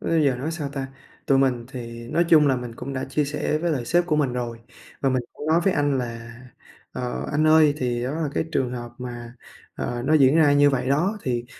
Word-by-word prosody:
bây 160 -2 +1
giờ 130 -3 +2
nói 140 +6 -3
sao 155 -4 -4
ta? 135 -1 -4 0.4
Tụi 135 - +4
mình 125 -3 +1
thì 115 -2 -8
nói 170 - +2
chung 150 -3 +6
là 135 -2 +3
mình 120 -2 -6
cũng 135 +4 -6
đã 130 - -3
chia 145 +2 -1
sẻ 150 +1 -1
với 170 +1 -1
lại 130 -6 -1
sếp 175 +6 +2
của 155 -3 +1
mình 135 -5 +1
rồi, 120 -2 -4 0.4
và 135 - +2
mình 130 -1 0
cũng 150 - -8
nói 165 +2 +3
với 195 - +3
anh 145 -2 +1
là 115 -1 -6 0.5
"Ờ, 125 -1 -4
anh 155 +2 +2
ơi 155 -2 +5
thì 120 -3 -2
đó 130 - -2
là 160 -2 -2
cái - - 0
trường 125 -2 0
hợp 120 -1 -6
mà, 120 -1 -7 0.4
ờ, 120 0 -4
nó 155 +3 +3
diễn 140 +1 +5
ra 150 -3 +5
như 145 0 +5
vậy 130 -1 -1
đó 180 +10 +1
thì 120 -2 -2
135 Hz, 245 wpm, -24 LUFS, 125-150 Hz, 0.5 s, chung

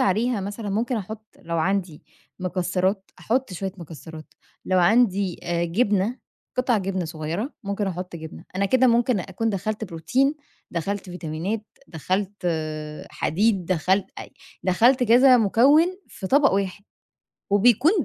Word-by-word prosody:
عليها 220 +3 +1
مثلًا 205 +2 -5
ممكن 235 +5 0
أحُط 220 +1 -8
لو 170 0 -2
عندي 185 -2 -1 0.4
مكسرات، 185 +2 -1
أحُط 250 -2 -1
شوية 190 +1 -4
مكسرات، 160 -1 -10 0.3
لو 185 - +2
عندي 195 -1 +3
آآ 170 0 -1
جبنة، 205 +5 +1 0.4
قطع 250 -3 +2
جبنة 190 -2 -2
صغيرة، 165 - -4
ممكن 200 +1 -2
أحُط 180 -1 -5
جبنة، 160 0 -10
أنا 200 +1 +2
كده 260 +5 +4
ممكن 240 -2 +3
أكون 195 +5 -2
دخَّلت 215 +2 -3
بروتين، 220 - 0 0.4
دخَّلت 195 +3 -3
فيتامينات، 180 +5 -4 0.2
دخَّلت 190 +4 -3 0.6
حديد، 195 +2 +1
دخَّلت 185 +2 +1
أي - - -10 0.3
دخَّلت 235 +8 +4
كذا 250 +3 +7
مكوِّن 250 - +5 0.2
في 190 - -7
طبق 275 +6 +4
واحد، 195 0 -2 0.7
وبيكون 240 - +5
195 Hz, 130 wpm, -24 LUFS, 180-225 Hz, 0.7 s, كذا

